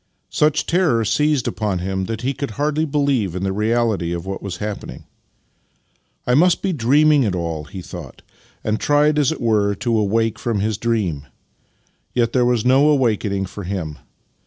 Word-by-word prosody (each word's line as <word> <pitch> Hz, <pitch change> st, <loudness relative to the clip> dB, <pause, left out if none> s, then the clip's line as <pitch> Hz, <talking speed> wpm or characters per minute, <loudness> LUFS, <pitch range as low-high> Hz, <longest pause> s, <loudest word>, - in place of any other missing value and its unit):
Such 155 Hz, 0 st, +2 dB
terror 160 Hz, -11 st, +2 dB
seized 150 Hz, +3 st, +1 dB
upon 105 Hz, -3 st, -1 dB
him 95 Hz, +1 st, -2 dB
that 110 Hz, +2 st, -4 dB
he 130 Hz, +3 st, -1 dB
could 140 Hz, -1 st, -4 dB
hardly 150 Hz, +2 st, 0 dB
believe 140 Hz, -, 0 dB
in 90 Hz, -, -3 dB
the 95 Hz, 0 st, -1 dB
reality 105 Hz, -5 st, 0 dB
of 85 Hz, 0 st, -5 dB
what 95 Hz, 0 st, -5 dB
was 95 Hz, -3 st, -5 dB
happening. 105 Hz, +1 st, -6 dB, 0.6 s
" -, -, -44 dB
I 125 Hz, -, +1 dB
must 170 Hz, +6 st, +3 dB
be 190 Hz, -2 st, 0 dB
dreaming 145 Hz, +3 st, +4 dB
it 105 Hz, -7 st, 0 dB
all," 85 Hz, -3 st, -3 dB
he 90 Hz, +5 st, -9 dB
thought, -, -, -10 dB, 0.4 s
and 110 Hz, 0 st, -1 dB
tried, 150 Hz, +1 st, +3 dB
as 145 Hz, -1 st, +2 dB
it 160 Hz, -, -4 dB
were, 105 Hz, -4 st, +1 dB
to 115 Hz, +3 st, -1 dB
awake 110 Hz, +1 st, +1 dB
from 115 Hz, -4 st, -1 dB
his 105 Hz, +1 st, -1 dB
dream: 95 Hz, -12 st, -1 dB, 0.9 s
yet 120 Hz, -2 st, +1 dB
there 125 Hz, -2 st, +3 dB
was 120 Hz, -2 st, +1 dB
no 135 Hz, +3 st, +5 dB
awakening 110 Hz, -8 st, +1 dB
for 100 Hz, +2 st, -8 dB
him. 85 Hz, -6 st, -4 dB
115 Hz, 180 wpm, -20 LUFS, 95-140 Hz, 0.9 s, no